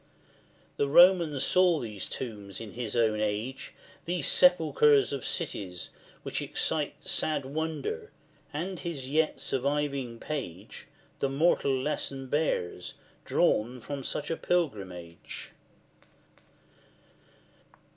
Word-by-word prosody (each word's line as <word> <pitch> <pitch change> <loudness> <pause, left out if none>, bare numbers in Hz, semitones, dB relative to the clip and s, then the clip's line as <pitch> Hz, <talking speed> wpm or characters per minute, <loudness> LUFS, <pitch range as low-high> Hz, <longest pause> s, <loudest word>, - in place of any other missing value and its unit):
The 140 - +2
Roman 170 -1 +6
saw 180 +2 +4
these 105 -6 -5
tombs 105 -6 -5
in 110 -3 -7
his 120 0 -4
own 110 -2 +2
age, 110 +5 -3 0.3
These 175 -3 0
sepulchres 150 -6 +5
of 135 -4 -3
cities, 90 -3 -3 0.3
which - - -2
excite - - -1
Sad 150 -3 +1
wonder, 160 - -3 0.4
and 175 +4 -4
his 140 -6 -5
yet 155 +1 +1
surviving 140 -2 -1
page 105 - -6 0.3
The 140 - +1
moral 140 -2 +2
lesson 135 -1 -2
bears, 145 - -1 0.3
drawn 120 +4 +2
from 140 +3 -6
such 150 +4 -3
pilgrimage. 95 - -3
140 Hz, 100 wpm, -29 LUFS, 115-155 Hz, 0.4 s, Roman